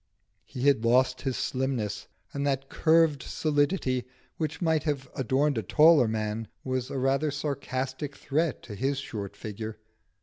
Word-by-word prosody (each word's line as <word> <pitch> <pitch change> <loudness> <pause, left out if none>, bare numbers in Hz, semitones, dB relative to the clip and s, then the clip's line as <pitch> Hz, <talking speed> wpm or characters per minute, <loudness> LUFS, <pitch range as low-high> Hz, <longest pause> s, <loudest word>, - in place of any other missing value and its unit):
He 125 - -6
had 135 -5 +4
lost 130 +2 +3
his 135 -3 -2
slimness, 120 -6 -2 0.3
and 140 - -2
that 135 -1 -1
curved 160 -3 +3
solidity 145 -4 0 0.3
which 160 -1 -3
might 160 -3 +2
have 140 -3 -2
adorned 135 +1 +1
a - - -1
taller 150 - +6
man 110 0 -2 0.2
was 130 -1 -2
a - - -4
rather 135 +3 +1
sarcastic 140 -1 -3
threat 150 +2 -1
to 110 - -8
his 135 +7 -1
short 100 -7 -5
figure. 110 0 -6
135 Hz, 145 wpm, -28 LUFS, 120-145 Hz, 0.3 s, taller